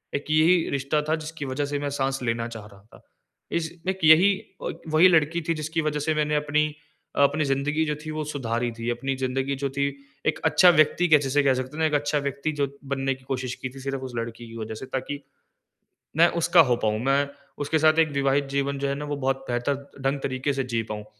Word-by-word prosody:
एक 140 - -3
यही 160 +3 +4
रिश्ता 140 +2 0
था 160 - +3
जिसकी 155 -1 -6
वज़ह 135 +2 -2
से 145 0 -3
मैं 145 0 -2
साँस 135 -1 -1
लेना 115 -1 -1
चाह 115 -3 -9
रहा 100 -2 -16
था। - - -15 0.5
इस 165 -1 -1 0.2
एक 190 0 -2
यही 160 +6 +7 0.4
एक - - -8
वही 155 +3 +6
लड़की 165 -1 +3
थी - - +4
जिसकी 155 +1 -2
वज़ह 150 -1 -1
से 155 +2 0
मैंने 150 0 +1
अपनी 150 0 +1 0.5
अपनी 155 +2 +2
ज़िंदगी 140 +3 0
जो 150 -1 -1
थी, 155 - -4
वो 155 0 -3
सुधारी 120 -5 -2
थी। 115 +1 -2
अपनी 135 +3 -2
ज़िंदगी 130 +1 -1
जो 140 - +1
थी, 140 +1 0 0.4
एक 155 0 +1
अच्छा 180 +3 +6
व्यक्ति 165 +1 +4
जिसे 140 +1 +1
कह 135 - +4
सकते 130 +2 -4
हैं - - -5
ना, 160 - +3
एक 155 - 0
अच्छा 145 +1 +1
व्यक्ति 140 +2 -2
जो 140 - +2 0.3
बनने 135 0 0
की 130 - -20
कोशिश 130 -2 -3
की 130 - -5
थी 135 +2 -12
सिर्फ़ 135 0 -4
उस 125 - -11
लड़की 115 0 -5
की 115 - -11
वजह 110 0 -5
से, 120 - -7
ताकि, 135 +2 -4 1.0
मैं 170 +2 +6
उसका 170 +1 +5
हो 120 - +3
पाऊँ, 105 0 +1
मैं 140 +1 +2 0.4
उसके 160 +3 +1
साथ 155 +1 +4
एक 160 -1 +5
विवाहित 140 0 +2
जीवन 140 0 0
जो 140 0 -1
है 140 - 0
ना, 145 +1 -5
वो 145 0 -3
बहुत 135 -1 -1
बेहतर 120 +3 0 0.3
ढंग 135 +1 0
तरीके 130 +1 -1
से 135 -1 -2
जी 115 - +2
पाऊँ। 105 0 -6
140 Hz, 230 wpm, -25 LUFS, 130-155 Hz, 1.0 s, यही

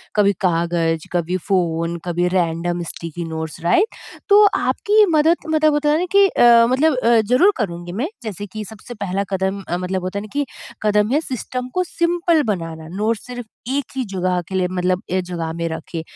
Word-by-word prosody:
कभी 205 -1 +4
कागज़, 165 -2 0
कभी 175 +1 0
फ़ोन 170 -3 0
कभी 175 0 0
रैंडम 175 -1 0
स्टिकी 170 +1 -6
नोट्स, 160 -1 -5
राइट? 360 - +3 0.4
तो 410 +1 +8
आपकी 425 +1 +3
मदद 320 +3 +4
मतलब 310 -1 +3
होता 295 0 +1
है 300 - +3
ना 360 - 0
कि 400 0 +6
अ, 235 -8 +6
मतलब 280 +4 +3
अ, 235 -2 +4
ज़रूर 250 - +4
करूँगी 175 -6 -4
मैं। 230 - -2 0.2
जैसे 205 -2 -5
कि 215 +2 -7
सबसे 220 +3 -10
पहला 200 -3 -2
कदम 190 +1 -1
अ, 175 - -1
मतलब 185 +1 -2
होता 185 +2 -3
है - - -7
ना - - -12
कि 285 0 0 0.4
कदम 210 0 +2
है 290 - +3
सिस्टम 255 -2 -4
को 365 - +1
सिंपल 340 -1 +1
बनाना 165 - -4
नोट 215 +5 -1
सिर्फ़ 245 +2 -8 0.3
एक 285 -2 -3
ही 265 - -1
जगह 185 -1 0
के 190 - -5
लिए 185 -1 +1
मतलब 180 0 -1
एक 185 0 0
जगह 170 -2 -4
में 170 0 -3
रखें। 160 +1 -5
195 Hz, 195 wpm, -20 LUFS, 175-255 Hz, 0.4 s, तो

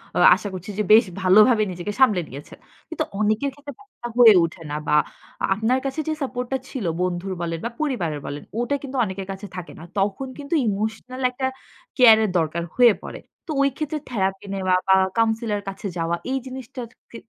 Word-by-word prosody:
আ - - -1 0.2
আশা - - -6
করছি 185 +3 -7
যে - - +2
বেশ 225 +3 +8 0.2
ভালোভাবে 215 +4 +6
নিজেকে 180 +4 -5
সামলে 215 -9 +5
নিয়েছেন। 140 +3 -11 0.3
কিন্তু 330 - -2 0.2
অনেকের 215 +6 +1
ক্ষেত্রে 285 -1 -10
ব্যপার 410 - -22
টা - - -2
হয়ে 230 -3 +9
ওঠে 165 +1 -4
না - - -2
বা 150 - +3 0.6
আপনার 225 +6 +1
কাছে 270 +3 -3
যে 315 - +1
সাপোর্ট 250 -1 -3
টা 265 - +1
ছিল 245 -9 -5 0.2
বন্ধুর 185 +1 -2
বলেন 165 -1 -3
বা - - 0
পরিবারের 180 - -1
বলেন। 145 +1 -6 0.2
ওটা 245 +4 0
কিন্তু 275 -1 -5
অনেকের 190 -1 -6
কাছে 195 +2 -7
থাকে 180 -2 -7
না। - - -10 0.2
তখন 200 +7 -1
কিন্তু 285 +3 -6
ইমোশনাল 220 +5 -3
একটা 260 +1 -3 0.5
কেয়ার 230 -4 +8
এর 210 - +1
দরকার 165 +1 -1
হয়ে 240 -4 +6
পড়ে। - - -7 0.3
তো 315 - -4
ওই 275 - +4
ক্ষেত্রে 305 0 -3
থেরাপি 195 -3 -1
নেওয়া 185 -1 +1
বা 190 - +6 0.2
কাউন্সিলর 225 -1 +1
এর - - -12
কাছে 195 +1 -6
যাওয়া 165 +1 0 0.2
এই 270 - +1
জিনিসটা 255 -1 -8 0.3
ক - - -22
ক - - -10
215 Hz, 200 wpm, -23 LUFS, 185-255 Hz, 0.6 s, হয়ে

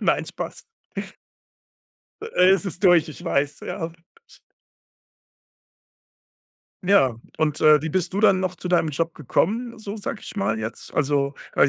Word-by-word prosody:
Nein, - - +2
Spaß. - - -6 1.6
Äh, 190 - +3
es 195 +1 +3
ist 185 0 -6
durch, 175 -3 +6
ich 155 - -10
weiß, 145 -3 0
ja. 165 0 -4 2.9
Ja, 180 - +4 0.2
und, 155 -1 0
äh, 155 -1 +7
wie 160 - -2
bist 185 +3 -1
du 200 - -1
dann 195 -3 +5
noch 185 -1 -1
zu 180 - -6
deinem 175 -3 +3
Job 165 +3 -2
gekommen, 230 - -1
so 210 0 -6
sage 210 +1 -5
ich - - -9
mal 110 - 0
jetzt? 110 +1 -6
Also, 140 -1 +1 0.2
äh, 140 - +5
170 Hz, 145 wpm, -23 LUFS, 150-195 Hz, 2.9 s, äh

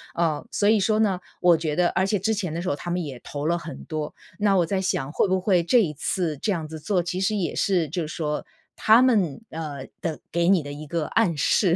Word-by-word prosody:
呃， 160 -3 0
所 205 - +2
以 215 -1 +5
说 215 +2 +2
呢， 195 -4 +2 0.2
我 175 -2 +6
觉 155 -2 -2
得 175 +1 +3
而 190 - +1
且 200 0 0
之 220 +4 +1
前 185 -6 -3
的 170 - -3
时 180 - -2
候 - - 0
他 175 +4 -6
们 175 0 -1
也 135 -5 -7
投 145 0 -5
了 170 +1 +2
很 165 -1 -8
多， 155 -1 -4 0.3
那 205 -2 +3
我 175 - +3
在 190 +3 -1
想 145 -6 -1
会 - - +2
不 185 0 +1
会 180 -3 +3
这 235 +7 +4
一 170 - 0
次 155 0 -2
这 210 - -1
样 165 -5 -2
子 160 0 -8
做 185 +2 0
其 180 +1 -3
实 195 +3 +1
也 185 -5 -1
是 175 -6 +1
就 175 +5 -2
是 - - -5
说 150 -3 -2 0.3
他 225 +3 +5
们， 205 - +2
呃， 150 -4 -5 0.2
的 165 -3 -3
给 170 +1 +2
你 190 -5 +4
的 145 - -7
一 150 +1 -8
个 165 0 -1
暗 185 -9 +1
示。 170 +4 +3
175 Hz, 275 characters per minute, -24 LUFS, 155-195 Hz, 0.3 s, 我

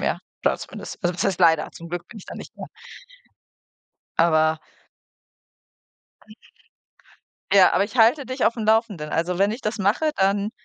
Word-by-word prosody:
mehr, - - -1 0.2
da - - +2
zumindest. - - -9
Also, 175 0 0
was 175 - -2
heißt 185 -1 -1
leider? 160 -3 +4
Zum 170 - -11
Glück 175 +1 -5
bin 225 - -11
ich - - -13
da - - -8
nicht - - -10
mehr. - - -8 1.5
Aber 160 -1 +3 2.9
Ja, 190 -1 +6
aber 200 - +2
ich 220 +5 -9
halte 245 +5 +4
dich 255 +1 -2
auf'm 230 -1 -1
Laufenden. 215 -8 +1
Also, 175 +2 -1
wenn 200 +1 +3
ich 230 +5 -5
das 215 +1 -3
mache, 210 +11 +1
dann 200 +2 +1
195 Hz, 160 wpm, -23 LUFS, 170-220 Hz, 2.9 s, Ja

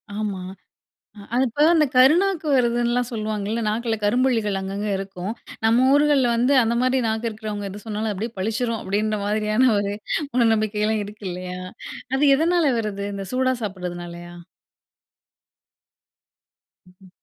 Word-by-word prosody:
ஆமா. 205 -3 -3 0.9
அது 245 - +3
இப்போ 270 +6 0
அந்த 310 -2 +4
கருநாக்கு 320 +6 +4
வருதுன்னுலாம் 240 0 +1
சொல்லுவாங்கல்ல. 215 0 -2
நாக்கில 225 +1 -1
கரும்புள்ளிகள் 225 -3 +1
அங்க 190 0 -5
அங்க 210 +1 -2
இருக்கும். 195 +1 -5 0.3
நம்ம 235 +4 +4
ஊர்களில 285 -3 +4
வந்து, 245 +4 +2
அந்த 230 +1 0
மாதிரி 255 +1 +2
நாக்கு 220 +1 -1
இருக்கிறவங்க 210 -2 -5
எது 200 +1 -9
சொன்னாலும் 215 0 -2
அப்படியே 215 +4 -4
பளிச்சிடும் 225 +4 -1
அப்படின்ற 210 +2 -1
மாதிரியான 215 +4 +2
ஒரு 200 0 -2 0.4
மூடநம்பிக்கைலாம் 215 -2 +1
இருக்கு 210 0 -11
இல்லையா? 180 0 -6 0.6
அது 270 - +1
எதனால 330 -1 +2
வருது? 200 -2 -3
இந்த 195 0 -5
சூடா 260 0 +2
சாப்பிட்றதுனாலையா? 175 -3 -6 2.5
ம். 185 +1 -20
215 Hz, 125 wpm, -23 LUFS, 200-245 Hz, 2.5 s, அந்த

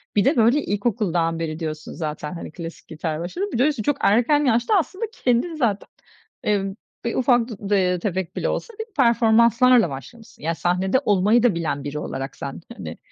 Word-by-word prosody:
Bir 205 - +3
de, 275 0 +3
böyle, 235 +6 +4
ilkokuldan 190 -6 0
beri 160 0 -3
diyorsun 155 -1 -5
zaten, 150 -1 -4
hani, 170 - -7
klasik 165 0 -9
gitarla 160 0 -4
başladın. 370 - -3
Bir - - 0
de 265 +5 +4
üstüne 270 -8 -1
çok 290 - +1
erken 250 +8 +3
yaşta 240 - +2
aslında 380 +6 -3
kendin 255 - 0
zaten, 230 -9 0 0.6
eee, 205 -2 +1 0.4
bir 235 - -1
ufak 245 -2 +3
dud 205 -4 -7
de 185 -3 +2
tefek 185 -1 -3
bile - - -1
olsa, 465 - -3
bir 445 - -3
performanslarla 235 - +5
başlamışsın. 180 - -11
Ya, 165 +1 0
sahnede 185 +7 +1
olmayı 210 +4 +3
da 235 -7 +3
bilen 160 -4 -2
biri 145 +1 -4
olarak 135 -2 -5
sen, 140 +4 -7 0.2
hani, - - -7
205 Hz, 185 wpm, -23 LUFS, 170-245 Hz, 0.6 s, performanslarla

